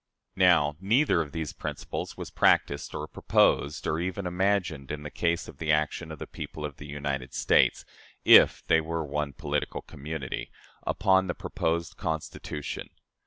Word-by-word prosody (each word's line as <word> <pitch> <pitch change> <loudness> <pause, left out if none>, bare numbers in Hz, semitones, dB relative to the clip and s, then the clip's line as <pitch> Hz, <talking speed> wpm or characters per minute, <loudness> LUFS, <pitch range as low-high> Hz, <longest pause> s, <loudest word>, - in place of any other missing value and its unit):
Now, 80 -5 +5
neither 110 - +3
of 75 -3 -5
these 80 -1 -4
principles - - -5
was - - -7
practiced - - +2
or 75 - -4
proposed 75 -1 +2
or 75 - 0
even 95 +2 -3
imagined 90 -6 0
in 75 0 -5
the 75 - -7
case 85 -1 0
of - - -12
the 80 -1 0
action 75 +2 0
of 80 - -7
the - - -6
people 75 - -7
of 75 -2 -7
the 75 - -9
United 70 -3 -4
States - - +3 0.4
(if - - +7
they 80 - +4
were 80 0 -3
one 75 0 -2
political - - -3
community) 75 -2 -5 0.4
upon 95 -1 +3
the 85 - -2
proposed 85 0 -2
Constitution. 80 -2 -4
80 Hz, 160 wpm, -28 LUFS, 75-85 Hz, 0.4 s, if